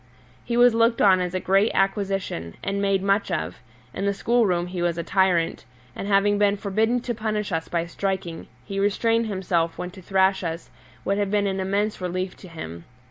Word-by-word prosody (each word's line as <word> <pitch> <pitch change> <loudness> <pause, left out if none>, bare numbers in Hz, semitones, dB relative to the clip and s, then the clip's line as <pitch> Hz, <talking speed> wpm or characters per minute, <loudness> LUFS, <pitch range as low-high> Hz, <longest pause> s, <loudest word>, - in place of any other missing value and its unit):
He 235 0 -2
was 245 -1 +6
looked 230 +1 +3
on 185 -2 +5
as 180 0 -2
a - - +1
great 195 +4 +3
acquisition, 195 - -1
and 200 0 -1
made 195 -1 +1
much 200 +1 +1
of; 175 -4 -3 0.3
in 200 - -2
the 200 - +1
school 235 +2 +2
room 175 -2 +1
he 180 0 -5
was 175 -1 0
a 170 - -2
tyrant, 185 -4 +1 0.3
and 195 - -5
having 205 0 +3
been 205 0 +3
forbidden 220 +5 0
to 240 - -3
punish 215 -2 -2
us 165 -1 -2
by 170 -1 -1
striking, 180 -1 -3 0.2
he 195 -1 -4
restrained 225 +3 +2
himself 180 -5 -1
when 180 - -5
to 190 - -12
thrash 190 +1 +2
us 165 0 -5 0.3
would 200 +1 +1
have 200 -1 0
been 205 0 +1
an 195 -1 -1
immense 200 +2 -1
relief 185 +1 -3
to 185 - -12
him. 85 - -8
195 Hz, 200 wpm, -24 LUFS, 180-205 Hz, 0.3 s, was